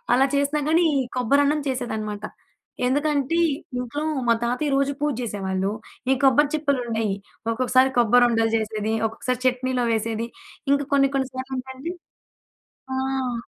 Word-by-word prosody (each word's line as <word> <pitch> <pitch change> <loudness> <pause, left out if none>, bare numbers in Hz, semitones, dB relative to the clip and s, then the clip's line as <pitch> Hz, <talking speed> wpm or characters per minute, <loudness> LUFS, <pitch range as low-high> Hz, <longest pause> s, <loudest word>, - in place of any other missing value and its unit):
అలా 265 +2 +5
చేసినా 285 +2 +1
గానీ, 335 +2 +4 0.3
కొబ్బరన్నం 285 +4 +3
చేసేదనమాట. 215 -5 -3 0.6
ఎందుకంటే, 290 +3 +1 0.4
ఇంట్లో 270 +5 -3 0.2
మా 235 - +6
తాతయ్య 250 +5 0
రోజూ 275 +1 +1
పూజ్జేసేవాళ్ళు. 205 -8 -1 0.4
ఈ - - +6
కొబ్బరి 280 +2 +5
చిప్పలుండేయి. 240 -8 0 0.3
ఒక్కొక్కసారి 255 +2 +3
కొబ్బరుండలు 235 -1 +4
చేసేది, 215 0 -2
ఒక్కొక్కసారి 250 +3 -3
చట్నీలో 255 -1 0
వేసేది. 225 +1 -1 0.4
ఇంక 280 0 +3
కొన్ని 275 -1 +4
కొన్ని 265 -1 0
సార్లు 260 +1 -5
ఏంటంటే 265 +7 -6 1.0
ఆ! 260 -3 -2
255 Hz, 115 wpm, -24 LUFS, 230-280 Hz, 1.0 s, మా